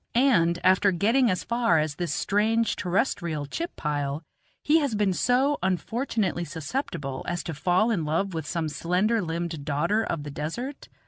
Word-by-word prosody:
And 220 -10 +4
after 190 +2 +4
getting 230 +8 +3
as 180 -2 -1
far 235 -7 +2
as 155 -1 0
this 170 0 -3
strange 220 +7 +1
terrestrial 175 - -1
chip 335 - -5
pile, 145 0 -2 0.4
he 310 +2 +4
has 280 -7 -1
been 205 -2 +2
so 260 +8 +2
unfortunately 190 0 -1
susceptible 160 - -4
as 175 0 -2
to 165 - -4
fall 180 +9 +2
in 185 -8 0
love 165 +6 -1
with 160 -1 -4
some 165 -2 -1
slender 185 +9 +1
limbed 165 -3 -3
daughter 170 +9 +1
of 165 -8 -3
the 145 - -6
desert? 235 - -5
180 Hz, 160 wpm, -26 LUFS, 160-230 Hz, 0.4 s, And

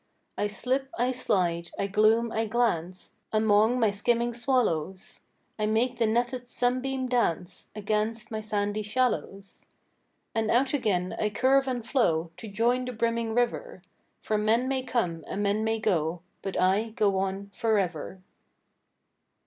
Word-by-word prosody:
I 205 - 0
slip, 260 +6 -1
I 245 +2 +2
slide, 175 -9 0
I - - 0
gloom, 215 +3 +3
I 225 0 -1
glance, 185 -6 -1
Among 220 +2 +3
my 220 -3 +3
skimming 235 +3 +1
swallows; 215 - -1 0.4
I 215 - +1
make 240 +3 +1
the 230 - +3
netted 245 +2 0
sunbeam 255 +2 -1
dance 180 -9 -1
Against 215 +2 -2
my 220 -1 -3
sandy 210 0 -1
shallows. 210 -3 -2 0.7
And 225 -1 0
out 260 +4 +2
again 190 -9 0
I 210 - +1
curve 270 +5 +3
and 245 -3 -2
flow 170 - +1
To 225 - -8
join 235 +5 +1
the 250 - -4
brimming 230 0 -1
river; 240 -6 -1 0.4
For 215 -1 0
men 225 +4 +2
may 265 -1 0
come 220 -11 -1
and 205 - -2
men 205 +2 +1
may 225 0 0
go, 175 -5 0 0.2
But 195 - -3
I 195 +5 +2
go 205 -3 +1
on 195 +1 -3
forever. 190 -5 -1
220 Hz, 145 wpm, -27 LUFS, 200-245 Hz, 0.7 s, gloom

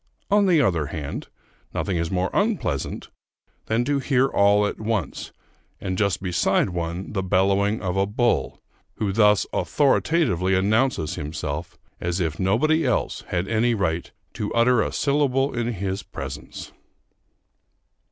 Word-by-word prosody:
On 205 -1 +4
the 175 -4 +4
other 85 - +1
hand, 75 -2 -5 0.5
nothing 95 - -1
is 85 -1 -1
more 90 +1 -1
unpleasant 200 - -1 0.6
than 115 +2 +1
to 145 +1 +1
hear 135 -1 +2
all 105 -4 +3
at - - -3
once, 105 -7 -2 0.5
and 95 - -3
just 100 -2 0
beside 90 +1 +1
one, 85 +2 -4
the 95 - 0
bellowing 100 +3 +1
of 90 -1 -1
a 95 0 +2
bull, 120 +3 0 0.4
who 105 -2 -1
thus 105 0 +4
authoritatively 135 - +2
announces 105 - +1
himself, 75 +1 -5 0.2
as 90 +1 -2
if 80 -3 -2
nobody 155 - +2
else 125 -5 0
had 90 +1 -2
any 115 +2 +2
right 85 -5 -1 0.2
to 105 - -4
utter 115 0 +4
a - - -1
syllable 140 -1 +1
in 120 -1 -1
his 95 0 -3
presence. - - -8
100 Hz, 140 wpm, -24 LUFS, 90-120 Hz, 0.6 s, On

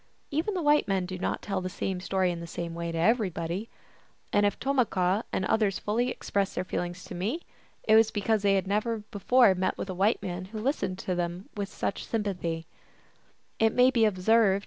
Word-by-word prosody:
Even 325 +8 -1
white 295 0 +4
men 190 -2 +1
do 185 0 -6
not - - -2
tell 195 -2 -2
the 185 - -3
same 185 0 -3
story 185 -1 0
in 170 - -5
the 170 - -7
same 170 +1 -5
way 170 0 -3
to 165 - -4
everybody; 185 0 0 0.6
and 205 0 +4
if 205 - -2
Tomahquah 220 -7 +1
and 190 - -1
others 210 -2 +2
fully 235 +4 0
expressed 200 -5 -2
their 180 - -1
feelings 180 0 -4
to - - -9
me, 210 - -2 0.4
it 215 - +3
was 220 0 +6
because 215 0 0
they 200 -1 +3
had 195 - +1
never 215 +2 -1
before 225 +1 +4
met 185 0 -1
with 195 - -4
a - - -3
white 195 +5 +2
man 180 -1 -4
who 215 +4 -8
listened 215 -6 -1
to 185 - -3
them 175 +2 -3
120 205 +1 -2 1.3
THE - - +2
ALGONQUIN 225 - +3 0.2
LEGENDS. 210 -5 +1
195 Hz, 190 wpm, -28 LUFS, 185-220 Hz, 1.3 s, was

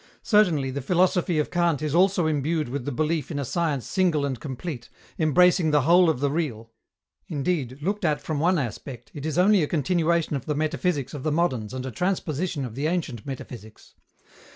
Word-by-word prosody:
Certainly, 170 - +3
the 140 +2 -4
philosophy 175 +3 +2
of 150 - 0
Kant 170 -4 +1
is 150 -2 -1
also 180 0 +3
imbued 155 -1 0
with 130 -1 -4
the 145 - -2
belief 155 +3 -1
in 155 - -4
a 140 - -2
science 150 -3 -1
single 170 -6 +1
and 130 -4 -3
complete, 135 -1 -6 0.3
embracing 175 +2 +4
the 150 -1 +3
whole 175 +3 +5
of 145 -5 -1
the 140 -1 +1
real. 120 -8 -3 0.6
Indeed, 145 - -2
looked 200 +4 -1
at 155 -3 +1
from 155 -3 -3
one 175 +4 +3
aspect, 125 -1 -5
it 145 0 -5
is 155 - -2
only 195 +1 +5
a 150 - +1
continuation 170 0 +1
of 135 -1 -5
the 150 - 0
metaphysics 155 -2 -1
of 145 - -5
the 155 - -1
moderns 130 -10 0
and 130 0 -5
a 130 - -4
transposition 170 - -2
of 120 - -7
the 140 +5 -1
ancient 155 - -3
metaphysics. 120 -5 -9
155 Hz, 195 wpm, -25 LUFS, 135-175 Hz, 0.6 s, whole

